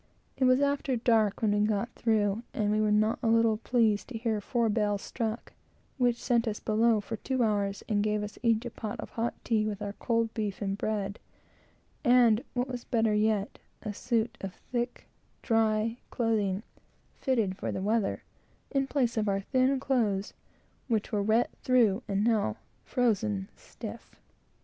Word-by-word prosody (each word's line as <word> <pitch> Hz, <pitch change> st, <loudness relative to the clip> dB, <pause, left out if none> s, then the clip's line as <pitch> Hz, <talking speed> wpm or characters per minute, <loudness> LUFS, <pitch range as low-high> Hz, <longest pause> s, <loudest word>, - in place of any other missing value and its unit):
It 260 Hz, -, +1 dB
was 255 Hz, +2 st, +5 dB
after 280 Hz, -2 st, +1 dB
dark 225 Hz, -3 st, +2 dB
when 215 Hz, -, +3 dB
we 205 Hz, -, +2 dB
got 215 Hz, +2 st, -1 dB
through, 215 Hz, -2 st, +1 dB
and 210 Hz, -1 st, +1 dB
we 215 Hz, 0 st, +2 dB
were 215 Hz, -1 st, +2 dB
not 215 Hz, +1 st, +2 dB
a -, -, 0 dB
little 225 Hz, -1 st, +4 dB
pleased 225 Hz, -3 st, +1 dB
to 255 Hz, -, -5 dB
hear 220 Hz, -2 st, -1 dB
four 235 Hz, +1 st, 0 dB
bells 210 Hz, -2 st, 0 dB
struck, 225 Hz, -1 st, -4 dB, 0.5 s
which 245 Hz, -1 st, +3 dB
sent 235 Hz, -1 st, +1 dB
us 215 Hz, -1 st, -2 dB
below 220 Hz, 0 st, +3 dB
for 225 Hz, +2 st, -5 dB
two 260 Hz, +2 st, -1 dB
hours, 205 Hz, -2 st, 0 dB
and 210 Hz, -2 st, +1 dB
gave 210 Hz, 0 st, 0 dB
us 210 Hz, -, -7 dB
each 230 Hz, -1 st, +2 dB
a 240 Hz, -, -4 dB
pot 215 Hz, -2 st, -6 dB
of -, -, -7 dB
hot 235 Hz, +1 st, -2 dB
tea 215 Hz, -2 st, +1 dB
with 205 Hz, -2 st, -3 dB
our 205 Hz, -1 st, -4 dB
cold 230 Hz, 0 st, 0 dB
beef 210 Hz, -3 st, -3 dB
and 195 Hz, -1 st, -1 dB
bread, 205 Hz, -2 st, -2 dB, 0.8 s
and, 240 Hz, -3 st, +5 dB
what 245 Hz, +1 st, 0 dB
was 250 Hz, -2 st, -5 dB
better 225 Hz, -2 st, +1 dB
yet, 210 Hz, -1 st, +1 dB, 0.2 s
a 210 Hz, -, -3 dB
suit 235 Hz, +1 st, -1 dB
of 195 Hz, -2 st, -5 dB, 0.2 s
thick, 245 Hz, 0 st, -2 dB, 0.4 s
dry 225 Hz, 0 st, +1 dB
clothing, 215 Hz, -4 st, 0 dB, 0.6 s
fitted 225 Hz, -8 st, +1 dB
for -, -, -4 dB
the 190 Hz, -, -3 dB
weather, 215 Hz, 0 st, 0 dB, 0.5 s
in 275 Hz, -1 st, +1 dB
place 250 Hz, -5 st, 0 dB
of 215 Hz, -1 st, +1 dB
our 195 Hz, 0 st, 0 dB
thin 260 Hz, +5 st, +2 dB
clothes, 220 Hz, -8 st, 0 dB, 0.5 s
which 220 Hz, -4 st, 0 dB
were 210 Hz, -, +1 dB
wet 220 Hz, +4 st, +2 dB
through 235 Hz, -5 st, +3 dB
and 200 Hz, 0 st, 0 dB
now 215 Hz, -, +1 dB, 0.3 s
frozen 105 Hz, -, 0 dB
stiff. -, -, -10 dB
220 Hz, 175 wpm, -29 LUFS, 210-235 Hz, 0.8 s, was